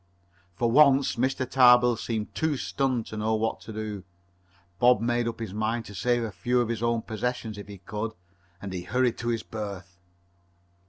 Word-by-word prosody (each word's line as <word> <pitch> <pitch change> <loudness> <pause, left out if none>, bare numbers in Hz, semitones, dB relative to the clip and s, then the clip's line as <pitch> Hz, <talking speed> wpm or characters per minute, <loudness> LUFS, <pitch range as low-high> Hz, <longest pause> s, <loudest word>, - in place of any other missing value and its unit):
For 115 +5 +1
once 140 0 +5
Mr. 130 +1 0
Tarbill 125 -2 +6
seemed 110 -1 -4
too 160 -3 0
stunned 130 -4 -1
to 110 - -8
know 110 +1 +1
what 110 +1 -1
to - - -9
do. 105 -3 -5 0.8
Bob 125 +1 +5
made 120 0 0
up 115 - -4
his 110 -5 -5
mind 110 +2 -1
to 100 - -10
save 120 +5 +1
a 110 - -3
few 125 +4 0
of 120 -2 0
his 115 -1 -2
own 115 -1 0
possessions 110 0 -3
if 100 0 -9
he 100 -1 -9
could, 105 +4 -5 0.5
and 95 0 -6
he 90 - -3
hurried 125 +5 0
to 115 - -4
his 115 -2 -1
berth. 100 -5 -7
115 Hz, 190 wpm, -27 LUFS, 105-125 Hz, 0.8 s, Tarbill